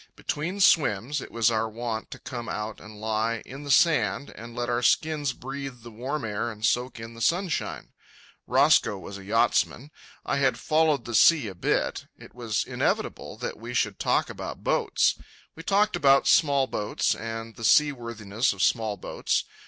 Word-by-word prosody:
Between 175 +7 -3
swims 145 - +3
it - - -9
was 115 0 +2
our 110 0 0
wont 115 0 -4
to - - -8
come 120 -3 -7
out 105 0 -4
and 105 0 -12
lie 110 +1 -1
in 135 +3 -9
the 145 - -8
sand 135 - +3
and 115 +1 -10
let 120 0 -2
our 120 0 0
skins 150 +1 +2
breathe 135 -1 -7
the 120 - -10
warm 130 +4 -4
air 110 +2 -2
and 110 0 -4
soak 125 0 0
in 115 +1 -8
the 115 - -11
sunshine. 175 - -1 0.6
Roscoe 105 - +4
was 100 +1 -9
a - - -11
yachtsman. 115 +6 +1 0.3
I - - 0
had 135 -2 +2
followed 155 -5 +1
the 120 - -6
sea 150 +4 +6
a 95 - -6
bit. 85 - -1
It - - -14
was 115 -3 -2
inevitable - - -2
that - - -5
we 120 +2 -7
should 105 -5 0
talk - - +1
about - - -7
boats. - - +1 0.4
We 165 - -9
talked 205 +4 +2
about 135 -1 +4
small 140 -4 +4
boats, 105 -5 -1
and 115 0 -6
the 115 - -10
seaworthiness 115 -5 +2
of 100 - -2
small 110 -3 +1
boats. - - -1
120 Hz, 175 wpm, -26 LUFS, 110-140 Hz, 0.6 s, sea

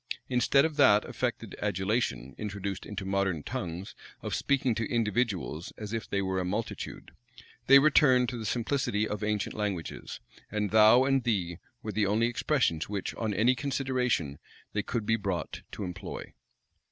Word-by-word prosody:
Instead 130 +3 +4
of 155 -2 -3
that 105 -7 +6
affected - - -3
adulation 95 - -1
introduced 100 -2 -4
into 100 -2 -5
modern 95 -5 0
tongues, 95 -7 -5 0.3
of - - -3
speaking 135 -3 +1
to 110 0 -2
individuals 105 -7 -1
as 105 0 -6
if 115 -2 -3
they 100 0 0
were 95 0 -1
a - - 0
multitude, 105 +5 -4 0.6
they 135 - +10
returned 140 -3 +5
to 125 - -3
the 115 - -5
simplicity 110 -1 0
of 105 0 -4
ancient 105 -1 -1
languages; 100 -6 -4 0.3
and 105 -2 -1
"thou" 110 +3 +7
and 135 -1 +2
"thee" 90 -7 -1 0.2
were 110 - -3
the 105 0 +1
only 110 +4 +2
expressions 120 - 0
which, 100 -2 -3
on 110 -2 -2
any 115 +5 +3
consideration, 125 - -1 0.3
they 105 - +1
could 115 +1 -3
be 110 +1 +2
brought 95 -7 -3
to - - -5
employ. 90 -2 -6
105 Hz, 160 wpm, -29 LUFS, 95-125 Hz, 0.6 s, they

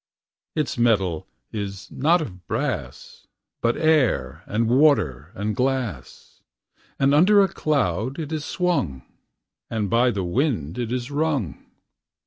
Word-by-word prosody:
Ita 145 -5 -1
metal 95 -9 +2 0.2
is 100 -3 -6
not 160 +4 +2
of 90 - -10
brass, - - -4 0.3
Bnt 115 0 +2
air, 135 - +2
and 115 +2 0
water, 115 - +3
and 105 +1 -2
grlass, 125 - -3 0.6
And 135 +1 +3
under 195 +6 +6
┬╗ - - -16
doad 130 - 0
it 155 -2 -5
is 155 -2 -2
swung. 145 - -1 0.7
And 105 -4 -2
by 120 +2 +4
the 100 -5 -2
wind 90 - -1
it 120 -2 -2
is 125 0 -2
niqg 145 - -1
120 Hz, 125 wpm, -23 LUFS, 95-145 Hz, 0.7 s, under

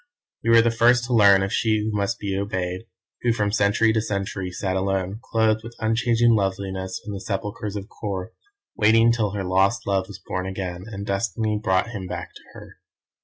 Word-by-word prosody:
You 115 - -1
were 115 0 +7
the 115 - +2
first 120 +1 +4
to 125 +1 -2
learn 100 -4 +6
of 100 +3 -3
She 110 -1 +2
Who 105 0 -2
Must 100 +3 -1
Be 100 -2 -3
Obeyed, 95 0 -3 0.3
who 120 - +2
from 105 -3 0
century 110 +1 +3
to 110 - +1
century 100 -3 -3
sat 95 +1 -3
alone, 95 +1 -1
clothed 110 -1 +1
with 115 +1 -10
unchanging 115 +1 +2
loveliness 95 -2 -2
in 105 - -5
the 100 - -5
sepulchres 105 +1 -4
of 100 -1 -4
Kôr, 100 -4 -5 0.5
waiting 115 +2 +5
till 110 -4 0
her 100 -2 -2
lost 95 +1 +1
love 95 -1 0
was 100 - -9
born 90 0 -4
again, 95 -1 -5
and 100 -3 -6
Destiny 105 +1 -1
brought 95 +5 +1
him 95 -5 -6
back - - -6
to - - -14
her. - - -12
100 Hz, 195 wpm, -23 LUFS, 95-115 Hz, 0.5 s, were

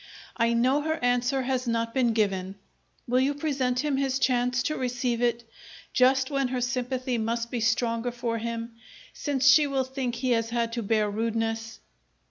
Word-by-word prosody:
"I 230 0 +2
know 255 +5 +2
her 315 +1 -1
answer 245 +2 +1
has 255 -1 -1
not 230 0 -1
been 245 -4 +2
given. 195 -3 0 0.5
Will 250 +1 +2
you 275 +2 +1
present 265 -4 0
him 295 -3 0
his 270 -1 0
chance 250 -1 +1
to 305 - -1
receive 245 -1 -1
it 235 -1 +1 0.5
just 260 +2 +3
when 275 -2 +1
her 255 0 -2
sympathy 250 0 -2
must 230 +1 -2
be 245 - -2
stronger 230 +1 +1
for 235 -1 -3
him, 230 +1 -4 0.4
since 275 -3 -1
she 290 +2 +7
will 270 -1 0
think 260 -2 -3
he 250 +1 -1
has 230 -1 +1
had 230 -1 -1
to 235 - -2
bear 215 0 +1
rudeness?" 225 +1 -2
245 Hz, 175 wpm, -27 LUFS, 230-260 Hz, 0.5 s, she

